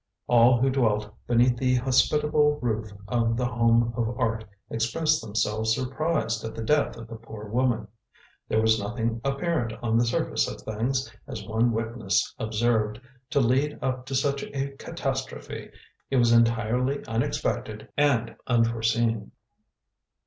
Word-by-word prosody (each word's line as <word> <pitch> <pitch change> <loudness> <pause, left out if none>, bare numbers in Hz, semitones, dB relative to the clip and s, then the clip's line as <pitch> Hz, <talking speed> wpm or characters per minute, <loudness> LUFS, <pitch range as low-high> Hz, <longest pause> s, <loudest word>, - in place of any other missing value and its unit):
All 120 +1 +5
who 135 +2 +3
dwelt 105 -5 +1
beneath 120 +1 +3
the 125 0 +2
hospitable 150 +4 +3
roof 110 -3 -2 0.2
of 115 0 +1
The 125 - 0
Home 115 -1 +2
of 120 0 -2
Art 115 -2 0 0.3
expressed 155 +8 +1
themselves 110 0 0
surprised 130 -4 -1
at 110 - -5
the 115 - -4
death 145 +1 +1
of 115 0 -9
the 115 0 -8
poor 110 -2 -10
woman. 120 0 0 0.6
There 110 - +2
was 110 0 +4
nothing 115 +2 -2
apparent 135 -3 -1
on 115 0 +2
the 120 - +3
surface 115 - 0
of - - -6
things, 125 +5 -2
as 110 -7 -6
one 115 +3 +1
witness 110 -3 -1
observed, 110 -1 0 0.3
to 140 - +2
lead 135 +4 +2
up 130 0 -2
to 135 - -3
such 140 +1 +1
a 140 0 -3
catastrophe. - - -4 0.4
It - - -1
was 120 -1 +4
entirely 115 +3 +2
unexpected 110 -1 -2
and 140 -5 +2
unforeseen. 115 -2 +1
115 Hz, 140 wpm, -26 LUFS, 110-130 Hz, 0.6 s, All